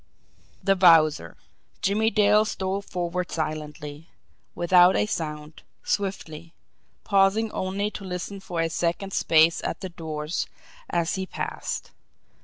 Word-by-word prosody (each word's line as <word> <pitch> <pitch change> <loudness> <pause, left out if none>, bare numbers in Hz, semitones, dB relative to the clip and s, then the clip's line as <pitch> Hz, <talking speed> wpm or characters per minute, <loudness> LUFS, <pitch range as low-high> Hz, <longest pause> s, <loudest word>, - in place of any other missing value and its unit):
The 195 -1 +3
Wowzer! 160 - +4 0.5
Jimmie 210 +3 +2
Dale 210 -1 +4
stole 195 -2 -2
forward 180 -2 -3
silently, 150 -1 -5 0.5
without 180 +1 +5
a - - +2
sound, 150 -5 -5 0.2
swiftly 170 -5 -3 0.5
pausing 200 +2 +2
only 200 +3 -2
to 205 - -8
listen 185 +2 -5
for 175 -3 -3
a 165 - 0
second's 175 +4 -1
space 160 +1 +4
at - - -3
the 190 - -5
doors 155 -2 -4 0.4
as 170 0 0
he 190 -1 -3
passed. - - -5
180 Hz, 120 wpm, -25 LUFS, 160-195 Hz, 0.5 s, without